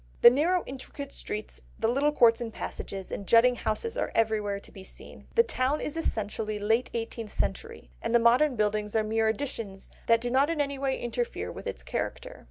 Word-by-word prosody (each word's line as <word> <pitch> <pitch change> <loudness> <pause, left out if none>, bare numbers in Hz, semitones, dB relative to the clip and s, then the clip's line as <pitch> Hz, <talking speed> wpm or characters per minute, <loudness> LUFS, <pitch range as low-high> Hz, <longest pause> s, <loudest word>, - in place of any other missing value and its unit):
The 235 - +10
narrow 335 +7 +2
intricate 275 +1 -7
streets, 210 0 -6 0.2
the 225 - +1
little 275 +5 +2
courts 235 -4 +5
and 230 -1 -4
passages, 195 -3 -6
and 200 - -5
jutting 245 +2 +6
houses 245 - -2
are - - -1
everywhere 215 -3 +1
to - - -15
be 190 - -11
seen. - - -12
The 465 - +7
town 270 - 0
is 295 - -4
essentially 215 -7 -2
late 220 +4 +1
eighteenth 225 -1 -4
century, 455 0 -3
and 230 +1 0
the - - +9
modern 245 +5 +4
buildings 210 -1 0
are 220 - +3
mere 220 +1 +1
additions 220 -4 -4 0.2
that 230 0 +5
do 245 0 -2
not 275 +4 +3
in 330 -2 -1
any 280 -1 -1
way 270 -1 -1
interfere 475 - -3
with - - -8
its - - -5
character. - - -4
235 Hz, 195 wpm, -28 LUFS, 215-280 Hz, 0.2 s, The